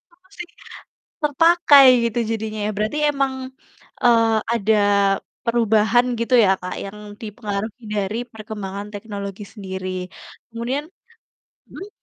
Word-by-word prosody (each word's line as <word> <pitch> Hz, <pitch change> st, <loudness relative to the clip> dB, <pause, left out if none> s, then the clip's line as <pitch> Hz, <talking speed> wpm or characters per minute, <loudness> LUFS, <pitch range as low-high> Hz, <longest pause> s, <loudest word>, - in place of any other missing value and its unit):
apa 370 Hz, +2 st, -32 dB
sih, 355 Hz, -, -6 dB, 0.8 s
terpakai 300 Hz, -1 st, +6 dB, 0.2 s
gitu 230 Hz, -, -4 dB
jadinya 220 Hz, -1 st, -3 dB
ya, -, -, 0 dB
berarti 215 Hz, +8 st, -1 dB
emang, 275 Hz, -2 st, -1 dB, 0.7 s
eee, 230 Hz, -2 st, +5 dB, 0.2 s
ada 220 Hz, -1 st, +2 dB, 0.7 s
perubahan, 230 Hz, 0 st, +3 dB, 0.2 s
gitu 235 Hz, +2 st, 0 dB
ya, 190 Hz, -, +4 dB
Kak, 180 Hz, 0 st, -6 dB
yang 200 Hz, +1 st, -8 dB, 0.2 s
dipengaruhi 215 Hz, +1 st, -5 dB
dari 205 Hz, +2 st, -2 dB
perkembangan 210 Hz, -2 st, -7 dB
teknologi 200 Hz, -1 st, -6 dB
sendiri. 190 Hz, -3 st, -6 dB, 0.6 s
Kemudian 245 Hz, +5 st, -3 dB, 0.8 s
mmm? 390 Hz, -, -9 dB
220 Hz, 110 wpm, -21 LUFS, 205-245 Hz, 0.8 s, terpakai